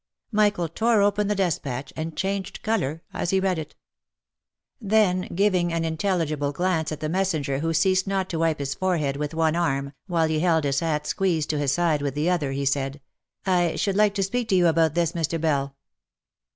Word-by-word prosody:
Michael 205 -5 +2
tore 220 +5 +2
open 205 0 +2
the 210 - 0
despatch, 145 -8 -2
and 160 0 -5
changed 195 -1 -3
colour 165 -8 -1
as - - -2
he 190 - +2
read 190 -3 0
it. 155 - -8 1.1
Then, 200 -3 +2
giving 185 -3 +2
an 165 0 -1
intelligible 160 -4 -1
glance 165 0 0
at 155 - -5
the 155 - -1
messenger 155 -6 0
who 165 +2 -1
ceased 185 +4 +2
not 195 -1 0
to 165 - -2
wipe 165 -1 +1
his 140 -1 -3
fore 185 +3 0
head 140 -3 -1
with 150 +2 -4
one 160 -1 +2
arm, 140 -4 -1
while 165 -3 +1
he 160 -1 0
held 165 -2 +2
his 140 -1 +1
hat 150 -2 -1
squeezed 165 -6 0
to 150 - -1
his 140 -2 +1
side 160 -2 +1
with 140 -1 -2
the 155 +5 +1
other, 150 -6 0
he 140 +1 -2
said, 135 +1 -1 0.3
" - - -62
I 175 -3 +2
should 200 -2 0
like 210 0 +3
to 195 - +1
speak 235 +4 -2
to 190 - +3
you 180 -1 +4
about 165 -2 +3
this, 170 -2 +1
Mr. 165 -1 -2
Bell." 140 -3 0
165 Hz, 205 wpm, -24 LUFS, 150-190 Hz, 1.1 s, you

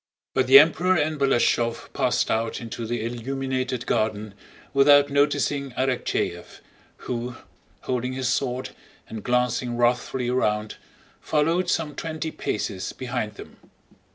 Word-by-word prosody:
But 130 -1 +1
the 135 +1 +10
Emperor 170 +5 +5
and 155 -2 0
Balashëv 120 -3 +1
passed - - +1
out 115 0 -1
into 115 0 -6
the 115 -1 -2
illuminated 130 +1 -3
garden 110 -2 -1 0.4
without 140 +1 +6
noticing 140 -1 +1
Arakchéev 130 -1 -2 0.5
who, 120 0 -4 0.5
holding 125 0 -2
his 130 -1 -2
sword 125 0 -1 0.4
and 110 -2 -7
glancing 125 -1 0
wrathfully 120 +1 +1
around, 105 -4 0 0.4
followed 165 +4 +1
some 155 -4 0
twenty 160 0 -4
paces 100 -7 -3
behind 125 -4 -4
them. - - -12
130 Hz, 120 wpm, -24 LUFS, 120-140 Hz, 0.5 s, the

